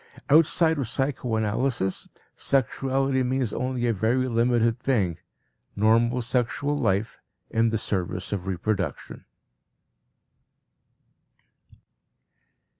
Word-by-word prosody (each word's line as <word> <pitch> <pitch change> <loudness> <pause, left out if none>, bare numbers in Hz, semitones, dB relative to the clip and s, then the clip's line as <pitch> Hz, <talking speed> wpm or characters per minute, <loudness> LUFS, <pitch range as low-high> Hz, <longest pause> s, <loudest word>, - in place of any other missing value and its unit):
Outside 160 +1 +4
of 130 - -2
psychoanalysis 120 -5 -1 0.3
sexuality 135 0 0
means 130 -2 -1
only 125 -1 -2
a 115 - +2
very 115 +6 +1
limited 115 0 +1
thing: 100 -12 0 0.6
normal 115 +4 +2
sexual 125 +4 -1
life 110 -6 -1 0.3
in 115 0 +2
the 115 - 0
service 95 -3 -3
of 95 -2 -3
reproduction. 95 -3 -3
120 Hz, 85 wpm, -25 LUFS, 110-130 Hz, 0.6 s, Outside